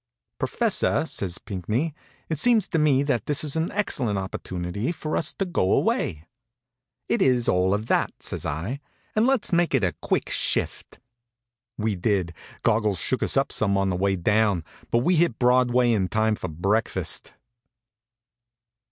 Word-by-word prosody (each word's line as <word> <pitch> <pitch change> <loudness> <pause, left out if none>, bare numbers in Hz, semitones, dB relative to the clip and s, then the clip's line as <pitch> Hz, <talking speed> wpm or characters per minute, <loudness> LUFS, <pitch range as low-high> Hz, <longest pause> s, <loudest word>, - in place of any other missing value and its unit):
"Professor," - - +1
says 95 -3 -2
Pinckney, 105 - -3 0.3
"it 160 -3 -2
seems 225 -3 +4
to 165 - 0
me 140 -3 +3
that 135 -5 -1
this 145 0 +1
is 150 -1 0
an 160 +1 -1
excellent 130 - -1
opportunity 95 - -3
for 155 -2 -4
us - - 0
to 195 - -2
go 175 - +1
away." 75 +1 0 0.8
"It's 130 - +2
all 90 +1 +2
of 105 +2 0
that," - - +1
says - - -5
I, 90 - -3 0.4
"and 215 +3 +3
let's 265 -8 +1
make 170 -4 +3
it 125 - +1
a 90 -3 +1
quick - - -1
shift." - - -2 0.8
We 110 0 0
did. 90 -3 0 0.3
Goggles 105 -4 +2
shook - - 0
us - - +1
up - - +1
some 100 -2 +1
on 95 -1 +1
the - - -1
way 95 +2 +1
down, 105 -1 +2 0.3
but 120 +1 +2
we 180 +3 +3
hit 160 -8 +2
Broadway 125 0 +3
in 100 -5 +1
time 110 +3 +1
for 100 - -4
breakfast. 100 +8 -1
110 Hz, 160 wpm, -25 LUFS, 95-145 Hz, 0.8 s, seems